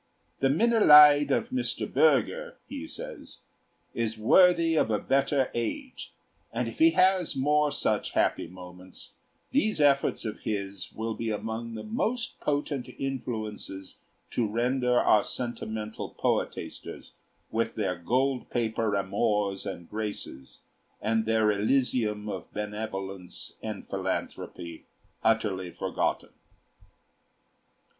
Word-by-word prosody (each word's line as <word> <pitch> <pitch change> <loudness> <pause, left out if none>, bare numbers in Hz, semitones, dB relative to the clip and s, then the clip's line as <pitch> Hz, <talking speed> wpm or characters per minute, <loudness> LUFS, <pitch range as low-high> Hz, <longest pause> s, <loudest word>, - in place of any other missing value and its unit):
"The 135 - +3
'Minnelied' 150 - +7
of 220 - +1
Mr. 255 -1 -1
Bürger," 485 +1 +2
he 285 +2 -6
says, - - -9 0.5
"is 115 -1 -2
worthy 170 +8 +5
of 155 - +2
a 105 - +2
better 135 +3 +1
age; 265 - -4 0.4
and - - -1
if - - -8
he 325 +1 +7
has 185 -2 +3
more 150 +2 +2
such - - -1
happy - - +1
moments, 90 0 -11 0.4
these 220 - +2
efforts 140 -4 +3
of 110 - -4
his 100 -3 -4
will 110 +1 -3
be 115 +1 -3
among 110 +2 -4
the 110 - -6
most 235 +2 -2
potent 145 -3 -2
influences 110 -7 -5 0.3
to 115 - 0
render 125 +3 +1
our 105 - +4
sentimental 110 -3 -4
poetasters, - - -3 0.4
with 115 0 -1
their 95 -4 -1
gold 125 +9 0
paper 110 -2 0
Amors 100 0 0
and 85 -3 -10
Graces 105 -11 -6 0.4
and 110 0 0
their 110 -1 +3
elysium 105 -1 +1
of 105 - -6
benevolence 100 -3 -5
and - - -6
philanthropy, 85 -2 -4 0.4
utterly 105 -5 +1
forgotten." - - -2
115 Hz, 115 wpm, -28 LUFS, 105-145 Hz, 0.5 s, Minnelied